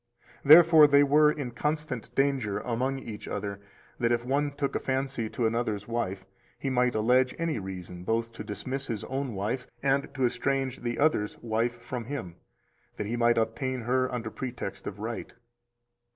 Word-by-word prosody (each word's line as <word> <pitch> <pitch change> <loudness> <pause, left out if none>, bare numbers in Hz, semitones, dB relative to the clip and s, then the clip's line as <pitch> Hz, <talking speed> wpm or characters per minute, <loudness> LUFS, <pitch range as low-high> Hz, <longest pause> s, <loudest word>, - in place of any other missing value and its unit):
Therefore 160 0 +9
they 140 0 +6
were 150 +1 +5
in 140 -5 -4
constant 150 -1 -3
danger 135 -7 +1
among 125 +3 -1
each 110 -5 -8
other 100 -1 -4 0.4
that 120 -1 +2
if 120 0 +1
one 145 +3 +1
took 140 -1 -3
a - - +1
fancy 130 -4 -2
to 120 - -1
another's 110 -3 -1
wife, 100 -5 -3 0.3
he 135 - -2
might 125 -1 +2
allege 125 +4 +3
any 165 -7 -1
reason 90 -2 -7
both 115 +3 -1
to 115 -2 -8
dismiss 130 +7 -5
his 110 -4 -3
own 130 -3 -3
wife 110 +6 -2 0.2
and 140 0 +1
to 130 -2 +2
estrange 135 +1 -1
the 120 -1 -3
other's 140 -9 +1
wife 120 +1 -1
from 120 0 -5
him, 115 -10 -6 0.6
that - - -2
he 115 +4 -2
might 120 0 +3
obtain 125 +3 -1
her 130 +2 +1
under 115 -3 -4
pretext 125 -6 -6
of 105 - -5
right. 110 +2 -5
125 Hz, 170 wpm, -28 LUFS, 110-135 Hz, 0.6 s, Therefore